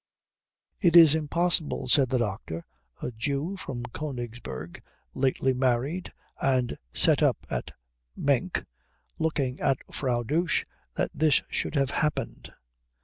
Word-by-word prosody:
"It 175 -5 +3
is 165 -4 +10
impossible," 160 -1 0
said 130 0 +4
the 130 - +2
doctor, 95 -7 -3 0.4
a - - -2
Jew 140 - -2
from 125 -10 -6
Königsberg, 120 - -6 0.3
lately 130 0 +1
married 130 +7 0 0.3
and 130 -3 +1
set - - +3
up - - +4
at - - -3 0.4
Menk, 145 +6 0 0.5
looking 145 -5 -1
at 135 - +2 0.2
Frau 125 -3 0
Dosch, 165 +8 +1 0.3
"that - - 0
this 155 -2 +3
should - - -1
have 135 -1 +2
happened." 150 -1 -2
135 Hz, 120 wpm, -27 LUFS, 120-155 Hz, 0.5 s, is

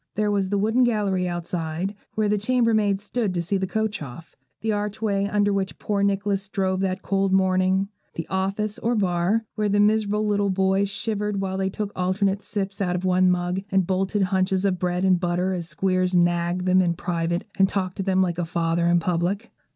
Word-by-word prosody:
There 210 0 +1
was 195 -2 0
the 205 - 0
wooden 220 +5 +2
gallery 200 -6 +1
outside, 175 +1 -3 0.2
where 215 -1 +1
the 210 0 +1
chamber 230 +1 +2
maids 205 -2 +1
stood 210 -3 -2
to 175 - 0
see 195 +4 0
the 190 0 -2
coach 220 -1 -2
off; 145 +4 -9 0.3
the 220 - 0
archway 205 -1 -1
under 205 0 +1
which 195 -1 -2
poor 205 -1 -1
Nicholas 200 0 0
drove 190 -2 0
that 190 0 -2
cold 195 -1 +1
morning; 190 0 +2 0.3
the 165 - -4
office, 195 +3 -2
or 235 +1 0
bar, 195 +2 +1
where 210 -1 -1
the 205 +1 +2
miserable 210 0 +2
little 205 -1 +1
boys 190 +1 +1
shivered 210 0 -2
while 190 -1 -2
they 190 0 0
took 205 +1 -4
alternate 195 +2 0
sips 200 -2 -3
out 180 -2 0
of 180 +1 -3
one 185 0 +4
mug, 180 +1 0
and 190 -1 +3
bolted 195 +2 0
hunches 190 0 +1
of 185 -2 +1
bread 180 +1 0
and 185 -2 +4
butter 180 +1 0
as 170 -2 -4
Squeers 185 +3 0
'nagged' 175 +1 +1
them 185 0 +4
in 170 -2 +1
private 170 +1 -2 0.2
and 190 0 +5
talked 185 -2 -2
to - - -1
them 190 0 +2
like 175 -2 -2
a - - +1
father 170 0 0
in 175 0 +4
public. 180 +6 -1
190 Hz, 205 wpm, -24 LUFS, 180-205 Hz, 0.3 s, and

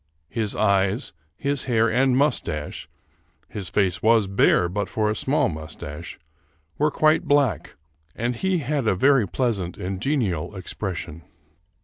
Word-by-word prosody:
His 110 -3 -1
eyes, 100 +3 +1 0.2
his 140 -1 -1
hair 115 -3 +2
and 125 +2 +2
mustache 75 - -1 0.6
(his 100 -4 -6
face 95 +1 0
was 110 -1 +4
bare 95 -2 +3
but 100 +3 -3
for 105 -1 0
a - - -2
small 145 +3 +1
mustache) 80 0 -7 0.6
were 150 +1 +3
quite 155 +1 +2
black, 145 -2 +1 0.4
and 120 +2 -2
he 190 +8 0
had 145 -4 -1
a 95 - +3
very 130 +1 +4
pleasant 100 -4 -2
and 95 +1 -4
genial 105 - -1
expres 95 0 -4
sion. 75 +3 -7
110 Hz, 140 wpm, -23 LUFS, 95-135 Hz, 0.6 s, was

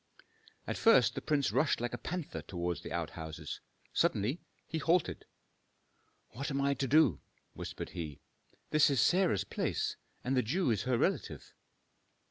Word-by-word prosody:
At - - -3
first 225 - +6
the - - -4
prince 145 -3 +1
rushed 155 - +2
like 120 +1 -2
a - - -2
panther 175 -2 -4
toward 85 -1 -3
the - - -8
outhouses. 80 -2 -5 0.3
Suddenly 120 - +1 0.3
he 160 - -3
halted. 165 +1 +1 1.1
"What 140 +7 -4
am 135 -1 -1
I 140 0 +2
to 140 -1 -2
do?" 135 - +5 0.3
whispered - - -6
he. 80 -5 -6 0.5
"This 155 -1 +5
is 140 -3 +2
Sarah's 180 - +3
place, - - -2 0.3
and 130 +2 0
the 130 - +4
Jew 140 - +1
is 110 0 0
her 130 -2 +2
relative." - - -1
135 Hz, 150 wpm, -33 LUFS, 100-155 Hz, 1.1 s, first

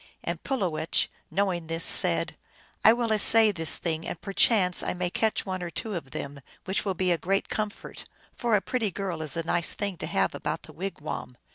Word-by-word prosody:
And - - -4
Pulowech, 180 - 0 0.2
knowing 175 -2 -1
this, 165 +1 -1
said, - - +4 0.2
" - - -31
I 220 - +9
will 235 -1 0
essay 215 +1 +6
this 165 -5 +3
thing, 165 -1 -3
and 165 - -5
per 195 - -7
chance 190 -5 +4
I - - -2
may 180 -1 -2
catch 220 +2 0
one 185 -2 -3
or 175 - -4
two 215 +5 -4
of 165 -7 -5
them; 140 +1 -6 0.2
which 190 - 0
will 195 -3 -2
be 185 0 +1
a 170 - +1
great 195 +5 0
comfort, 215 -1 -5 0.3
for 235 -3 +1
a 200 - +2
pretty 230 -2 -1
girl 185 -3 -4
is 155 -1 -3
a 165 - -1
nice 170 +1 +1
thing 200 -3 -3
to - - -4
have - - +1
about - - -4
the - - -12
wigwam." 155 -8 -6
185 Hz, 215 wpm, -27 LUFS, 165-205 Hz, 0.3 s, I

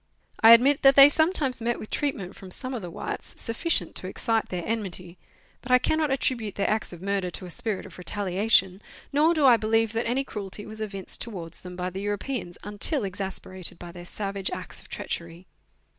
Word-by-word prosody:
I 225 +1 +10
admit 270 +5 +5
that 270 0 +7
they 275 +1 +10
some 315 +4 +3
times 270 -9 -1
met 235 +1 0
with 215 - -9
treatment 230 -11 -2
from 190 - -11
some 255 +7 -2
of 240 - -3
the 175 - -6
whites - - -6
sufficient 230 - 0
to 185 - -3
excite 225 +3 -1
their 180 -2 -3
enmity, 185 -5 -4 0.4
but 250 - -6
I 250 - +8
cannot 310 +4 +1
attribute 245 -6 -1
their 200 - 0
acts 215 +1 0
of 175 0 -10
murder 195 -2 -1
to 185 - -6
a 180 - -7
spirit 210 +2 -3
of - - -12
retaliation, 190 +1 +1 0.3
nor 310 +4 +4
do 300 -3 +3
I 245 -3 +8
believe 225 0 +1
that 230 +1 -1
any 260 +3 +1
cruelty 205 -4 -6
was 220 0 -8
evinced 195 -3 -3
towards 175 -8 -4
them 180 0 -9
by 180 0 -3
the 190 +2 -5
Europeans 205 -1 -3
until 210 +7 0
exasperated 190 -2 -4
by 175 0 -9
their 175 0 -10
savage 195 0 -3
acts - - -7
of - - -18
treachery. 170 +2 -5
210 Hz, 205 wpm, -26 LUFS, 185-245 Hz, 0.4 s, I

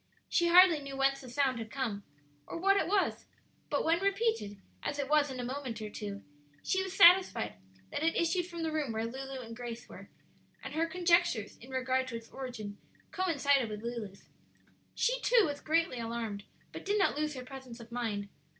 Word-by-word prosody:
She 345 - +2
hardly 350 -2 +7
knew 275 -1 -7
whence 275 0 +2
the 255 - -10
sound 260 -1 +1
had 225 -1 -6
come, 230 -6 -3 0.5
or - - -5
what 390 +3 +4
it 395 - +1
was; 395 +1 +1 0.4
but 290 - 0
when 330 +1 +3
repeated, 395 - 0 0.2
as 285 - -3
it 285 -2 -2
was 295 0 +3
in 260 -1 -6
a - - -2
moment 255 -3 -4
or 215 -1 -6
two, 200 -1 -6 0.4
she 380 - +1
was 380 0 -5
satisfied 350 - +6 0.4
that - - -3
it 325 +1 +2
issued 345 +1 +1
from 340 -2 -5
the 320 - -1
room 300 -7 -1
where 220 +1 -1
Lulu 265 +2 -6
and 230 -1 -8
Grace 240 0 -7
were, - - -12 0.5
and - - -6
her 325 +1 +1
conjectures 340 - +2
in 250 - -14
regard 260 0 0
to 245 - -5
its 230 0 -8
origin 220 -6 -6 0.3
coincided 285 -9 +2
with 210 0 -6
Lulu's. 230 -5 -6 0.7
She, - - +1
too, 480 -3 +5
was 290 -2 -4
greatly 325 -5 +1
alarmed, 225 -3 -4 0.3
but - - -8
did 405 +2 +1
not 390 - +3
lose 300 0 -1
her 255 -1 -7
presence 260 -3 -9
of 235 0 -12
mind. 220 -4 -2
270 Hz, 195 wpm, -32 LUFS, 235-335 Hz, 0.7 s, hardly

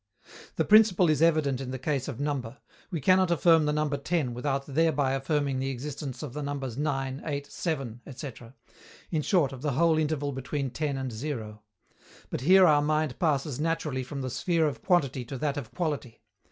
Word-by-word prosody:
_ - - -18
The - - +1
principle 205 -6 +6
is 150 -1 0
evident 155 -5 +3
in 130 - -5
the 130 - -3
case 135 0 -2
of 135 -4 -5
number: 140 -4 -3 0.3
we 175 -5 -3
cannot 185 +5 +4
affirm 165 -1 +4
the 150 - +1
number 150 -1 0
10 140 -3 -1
without 135 +2 -2
thereby 145 -2 +1
affirming 135 0 0
the 135 +1 -1
existence 135 0 -5
of 140 -5 -6
the 150 - -4
numbers 140 -4 -4
9, 135 -2 -2
8, 145 -2 -3
7,..., 135 -9 -4
etc. 130 -2 -9 0.6
in 160 -3 +1
short, 150 -5 +2
of 130 - -9
the 145 -2 -1
whole 160 +3 +3
interval 150 -2 -1
between 135 0 -3
10 145 0 -2
and 130 -1 -3
zero. 110 -4 -5 0.7
But - - -3
here 185 +6 +7
our 150 -3 +5
mind 155 -2 0
passes 145 -4 0
naturally 150 -4 -1
from 140 +2 -6
the 130 - -3
sphere 165 +2 +1
of 130 -6 -4
quantity 140 -8 +1
to 135 +3 -6
that 140 +1 -1
of 135 -6 -5
quality. 145 -9 -4
145 Hz, 195 wpm, -28 LUFS, 130-155 Hz, 0.7 s, here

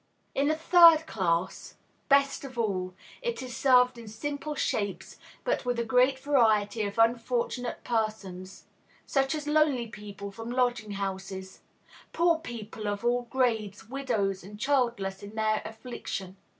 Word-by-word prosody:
In 280 +2 +1
a 310 - +2
third 330 -1 +7
class, 180 - -1 0.3
best 280 0 +3
of 260 -3 -9
all, 185 -5 -1 0.3
it 475 - -3
is 250 -2 -7
served 250 -2 +4
in 230 - -10
simple 290 +7 -4
shapes, 200 -7 -2 0.2
but - - 0
with 245 -1 -1
a 235 - 0
great 255 +3 +3
variety 225 -6 +2
of 200 - -8
Unfortunate 235 +1 0
Persons, 205 -5 -3 0.4
such 270 +1 +1
as 300 -1 -5
lonely 300 -5 +2
people 205 -2 -8
from 225 +3 -8
lodging 245 -4 0
houses, 190 -1 -5 0.5
poor 335 -1 +3
people 220 -7 -7
of 205 +3 -3
all 245 0 +1
grades, 225 -5 -1
widows 225 -9 -1
and 205 +2 -11
childless 235 -8 0
in 205 +2 -10
their 215 -1 +1
affliction. 220 -4 -6
235 Hz, 140 wpm, -28 LUFS, 205-270 Hz, 0.5 s, third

